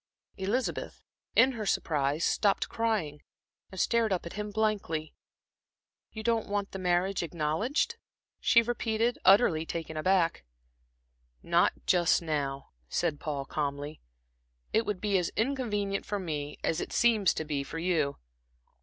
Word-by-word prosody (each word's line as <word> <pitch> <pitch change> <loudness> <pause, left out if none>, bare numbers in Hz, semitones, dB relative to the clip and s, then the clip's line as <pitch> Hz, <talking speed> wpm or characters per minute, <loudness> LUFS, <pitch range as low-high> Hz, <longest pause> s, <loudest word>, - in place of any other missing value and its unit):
Elizabeth, 210 +7 -2 0.3
in 265 - +6
her 225 -4 -5
surprise, 150 -1 +1
stopped 200 -2 +2
crying 205 -11 -1 0.5
and 190 - -7
stared 230 -2 +2
up 185 -2 -1
at 170 - -7
him 210 0 -4
blankly. 205 -7 -1 1.0
"You 220 - -7
don't 230 -2 0
want 200 -1 -1
the 195 - -6
marriage 180 +1 +1
acknowledged?" 175 - -1 0.4
she 235 -1 +5
repeated, 230 0 0
utterly 190 -5 +5
taken 165 -1 -5
aback. 170 - +2 1.0
"Not - - +3
just 175 -2 +4
now," 140 -4 -3 0.2
said 155 - 0
Paul, 145 -4 -3
calmly. 145 +1 -3 0.7
"It 225 - +2
would 205 -3 -2
be 200 -3 +2
as 175 - -1
inconvenient 215 -5 -1
for 205 - -1
me, 150 -6 -4
as 165 - 0
it - - -5
seems 220 -6 +4
to 160 - -3
be 145 -2 -2
for 150 - -7
you. 165 -4 0
185 Hz, 135 wpm, -29 LUFS, 155-220 Hz, 1.0 s, in